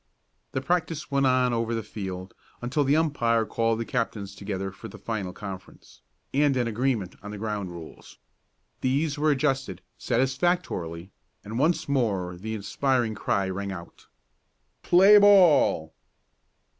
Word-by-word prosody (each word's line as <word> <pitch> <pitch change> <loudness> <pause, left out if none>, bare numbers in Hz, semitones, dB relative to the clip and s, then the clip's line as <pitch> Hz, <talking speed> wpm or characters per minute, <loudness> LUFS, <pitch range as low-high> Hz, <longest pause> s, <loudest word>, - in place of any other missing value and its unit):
The 130 - -1
practice 165 -1 -1
went 140 -1 +3
on 125 -1 +3
over 115 0 -1
the 115 - -3
field, 95 -3 -6 0.3
until 130 +5 0
the 140 +2 +3
umpire 120 -8 +2
called 115 +1 0
the 115 - -2
captains 110 -5 -3
together 95 -1 -4
for 95 - -10
the - - -11
final 105 -5 -4
conference, 95 -2 -10 0.3
and 140 -1 +3
an 120 -2 +1
agreement 115 -4 -1
on 105 - -8
the 105 - -6
ground 105 -3 -3
rules. 85 -2 -11 0.6
These 145 +3 0
were 155 +1 +3
adjusted 135 - 0 0.2
satisfactorily, 130 - -1 0.3
and 110 +4 -5
once 165 +5 +1
more 100 -10 0
the 110 +5 -5
inspiring 120 +2 0
cry 100 -2 -1
rang 100 +1 -4
out: 85 -2 -10 0.7
"Play 195 +4 +7
ball!" 175 - +5
115 Hz, 140 wpm, -26 LUFS, 100-140 Hz, 0.7 s, Play